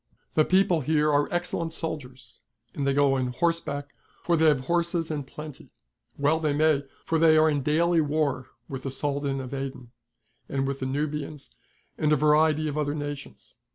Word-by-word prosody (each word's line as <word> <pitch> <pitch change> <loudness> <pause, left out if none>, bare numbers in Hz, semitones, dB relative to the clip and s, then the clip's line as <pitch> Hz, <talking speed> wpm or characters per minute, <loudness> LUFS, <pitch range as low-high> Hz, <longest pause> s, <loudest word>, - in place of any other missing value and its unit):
The 155 - +4
people 185 -3 +3
here 150 +1 +2
are 145 0 +2
excellent 175 -2 -2
soldiers, 135 -6 -7 0.3
and 140 -1 -2
they 140 - +3
go 140 -1 +4
on 130 -1 0
horseback, 145 +1 -1 0.3
for 170 - +2
they 160 0 +3
have 145 -4 +3
horses 170 +2 -1
in 145 -3 -3
plenty. 150 +1 -10 0.5
Well 145 +3 +2
they 155 -2 0
may; 150 -1 +2 0.2
for 165 - +1
they 160 -1 +6
are 155 0 +5
in 145 -2 +1
daily 165 +4 +2
war 145 -3 -1 0.2
with 135 -1 -6
the 135 - -4
Soldan 140 0 -2
of 130 0 -6
Aden, 135 -3 -6 0.6
and 135 -1 -1
with 135 0 -3
the 130 - -2
Nubians, 150 +1 -4 0.5
and 155 -1 +2
a - - +6
variety 155 +1 +3
of 150 0 -2
other 145 0 -1
nations. 145 -1 -7
150 Hz, 180 wpm, -26 LUFS, 140-160 Hz, 0.6 s, they